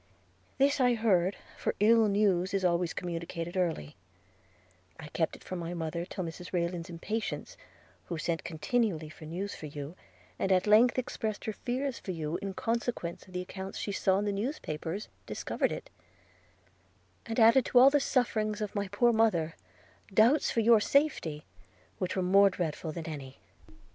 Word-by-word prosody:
This 280 +1 +3
I 245 -2 +4
heard, 195 -5 +2 0.2
for - - -2
ill 225 +1 +5
news 195 -2 +2
is 190 -1 +1
always 170 -1 +2
communicated 170 0 -5
early; 165 - -1 1.0
but 160 - -9
I - - -10
kept 160 +1 -1
it - - -15
from 185 - -5
my 170 +1 -4
mother 170 +1 -3
till 185 - -5
Mrs 170 +1 -7
Rayland's 170 0 -2
impatience, 215 +6 -4 0.5
who 170 - -4
sent 165 +1 -2
continually 165 -1 -1
for 155 - -12
news 185 +6 -4
of 150 -2 -8
you, 145 +3 -6 0.4
and 195 - 0
at 185 -1 +4
length 220 +4 +5
expressed 220 -4 -3
her 220 - -2
fears 255 +3 -3
for - - -11
you, 160 -1 -3
in 195 -1 -4
consequence 230 -7 -2
of 185 - -15
the 180 - -2
accounts 190 +1 -7
she 205 - -3
saw 190 -1 +2
in 205 - 0
the 205 - 0
newspapers, 200 - -3 0.2
discovered - - -1
it; - - -6 1.4
and 225 +1 -2
added 230 +3 +7
to - - +1
all 260 +3 +9
the 290 - +4
sufferings 215 -6 0
of 210 -2 -3
my 200 -1 -1
poor 235 +5 +3
mother, 180 -8 +2 0.6
doubts 230 +8 +4
of 225 - +4
your 230 -1 +7
safety, 210 - +1 0.5
which 185 -1 -2
were 190 - 0
more 195 +2 +6
dreadful 165 -3 -3
than 165 0 -6
any. 140 -5 -7
190 Hz, 170 wpm, -30 LUFS, 170-225 Hz, 1.4 s, all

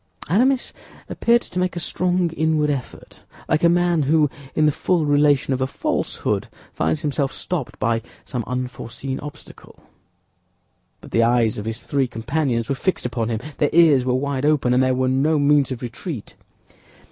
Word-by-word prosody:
Aramis 250 - +2 0.4
appeared 235 +1 +2
to 180 - -5
make 180 0 0
a - - -2
strong 180 0 0
inward 155 -2 +1
effort, 135 -4 -7 0.3
like 155 - +1
a 170 - +6
man 175 -1 +2
who, 150 0 +3 0.2
in 155 - +3
the 150 - +4
full 170 +2 0
relation 145 -2 +3
of 130 - -2
a 130 - +1
falsehood, 140 - -2 0.3
finds 80 +1 0
himself 140 -2 -1
stopped 165 -8 -4
by 115 0 0 0.2
some 125 -4 -3
unforeseen 125 +1 -4
obstacle; 145 0 -11 1.2
but - - -13
the 115 - +3
eyes 115 -2 +2
of 105 - -6
his 115 +1 -4
three 140 -2 0
companions 120 0 -1
were - - 0
fixed 185 +4 -1
upon 115 -2 -2
him, 110 -1 -2 0.2
their 145 - +3
ears 160 -6 +6
were 125 0 +1
wide 140 0 -1
open, 145 -4 +2
and 125 - +4
there 130 0 +2
were 130 0 +1
no 140 +5 +2
means 145 -1 +3
of 130 -2 -5
retreat. 125 - -6
140 Hz, 170 wpm, -22 LUFS, 125-160 Hz, 1.2 s, a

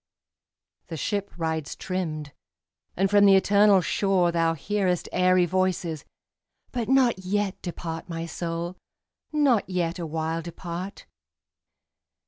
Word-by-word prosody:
The 165 - -6
ship 200 +5 -2
rides 160 -3 -2
trimmed, 155 -6 -4 0.6
and 195 +2 +3
from 205 +1 +5
the 195 - +7
eternal 200 0 +5
shore 185 -1 +2
Thou 165 -1 +1
hearest 185 +2 -1
airy 185 0 +4
voices; 175 -4 -1 0.7
but 240 -2 -3
not 260 -6 +4
yet 195 +1 -2
Depart, 165 -1 -6
my 165 -1 -4
soul, 170 +1 -4 0.5
not 275 -10 +2
yet 180 -1 -1
awhile 160 0 -2
depart. 175 +3 -7
180 Hz, 110 wpm, -26 LUFS, 165-195 Hz, 0.7 s, the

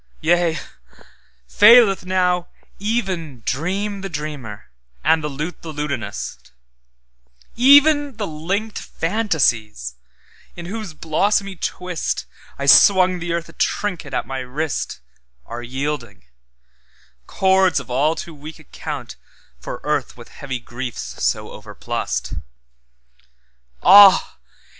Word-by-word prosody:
Yea, 170 -1 +2 0.9
faileth 210 - +6
now 180 -1 +1 0.3
even 185 - -3
dreamThe 195 - -3
dreamer, 145 - -7 0.3
and 160 -1 +3
the - - -1
lute 150 +4 -6
the 165 - -7
lutanist; 140 -8 -5 1.1
Even 285 +1 +5
the 210 - -2
linked 195 +7 -3
fantasies, 130 - -1 0.6
in 175 - -8
whose 200 -3 -6
blossomy 195 +5 0
twistI 180 0 -3 0.4
swung 185 +4 +6
the 175 0 -4
earth 170 0 -2
a - - -15
trinket 200 -6 -2
at - - -2
my 135 0 -5
wrist, 135 - -4 0.4
Are 120 +1 -7
yielding; 130 - -5 1.0
cords 190 -3 +3
of - - -10
all 145 +6 +2
too 170 - -7
weak 150 +2 -10
accountFor - - -9
earth - - -2
with - - -13
heavy 130 - -6
griefs 120 0 -7
so - - -1
overplussed. - - -5 1.5
Ah! 195 +1 +7
165 Hz, 100 wpm, -20 LUFS, 140-195 Hz, 1.5 s, Ah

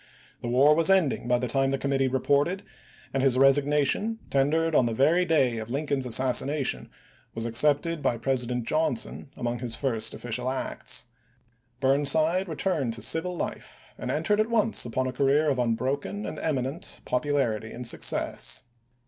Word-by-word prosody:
The - - -5
war 135 +5 +5
was 165 +3 +2
ending 180 -10 +2
by 125 0 +3
the 125 +1 -2
time 135 +3 +1
the 135 - 0
committee 135 -1 0
reported, 145 +8 0 0.5
and 135 - 0
his 130 -2 +3
resignation, 145 - +2
ten 135 0 +3
Api.i4,i865. 165 +2 0
dered - - -2
on 130 - +4
the 115 - -2
very 165 +8 +3
day 135 -8 +1
of 110 +1 -7
Lincoln's 140 -1 -2
assassination, 130 +3 +1 0.5
was 115 0 -3
accepted 145 +7 +2
by 120 - 0
President 125 -1 -2
Johnson 155 -4 -1
among 120 -1 -3
his 120 -2 -2
first 115 -4 0
official 125 +1 -3
acts. 125 -1 -3 0.7
Burnside 145 +7 +3
returned 155 -7 -1
to 115 - -8
civil 175 +2 +1
life, - - -7
and - - -5
entered 210 0 0
at 215 +1 +1
once 225 - +1
upon 130 +2 -2
a 130 - -3
career 140 +3 +2
of 130 - -2
unbroken 130 - -2
and - - -6
eminent 140 +1 -3
popularity 125 -5 -1
and 125 +1 -7
success. 115 - -1
135 Hz, 165 wpm, -26 LUFS, 125-155 Hz, 0.7 s, war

